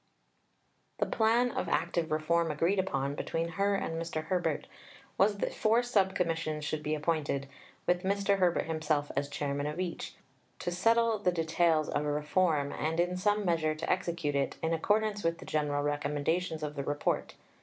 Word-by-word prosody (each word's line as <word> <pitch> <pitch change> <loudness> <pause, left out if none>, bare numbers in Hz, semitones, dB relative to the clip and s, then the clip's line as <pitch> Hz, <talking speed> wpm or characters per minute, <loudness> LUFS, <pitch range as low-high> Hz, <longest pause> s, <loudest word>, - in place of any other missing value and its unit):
The - - +1
plan 235 +2 +2
of 175 - -2
active 170 -1 0
reform 165 +2 +1
agreed 165 +6 +1
upon 140 -7 -1
between 165 +3 -2
her 200 +3 +1
and 165 -4 -2
Mr. 165 -2 -3
Herbert 165 -2 -1 0.5
was 205 +1 +3
that - - -2
four 225 +3 +3
Sub 200 -6 +2
Commissions 165 -4 -1
should 155 0 -2
be 150 +1 -1
appointed, 150 -3 -1 0.4
with 175 0 +2
Mr. 200 +1 +1
Herbert 180 -2 +2
himself 155 -2 -1
as 140 +1 -1
Chairman 145 0 -2
of 150 +3 -4
each, 180 -2 -4 0.4
to 175 - -3
settle 225 +4 +3
the 185 -3 +2
details 165 -2 +2
of 145 - -1
reform, 150 0 +1
and 160 +2 -2
in 175 +1 +1
some 205 +2 +1
measure 160 -3 +1
to 155 - -5
execute 170 -5 -1
it, 140 -1 0
in 160 +1 +1
accordance 210 +5 +1
with 165 0 +1
the - - -11
general 145 -2 0
recommendations 150 +3 -1
of 150 -1 -3
the 140 - -3
Report. 145 +1 -1
165 Hz, 170 wpm, -31 LUFS, 150-185 Hz, 0.5 s, was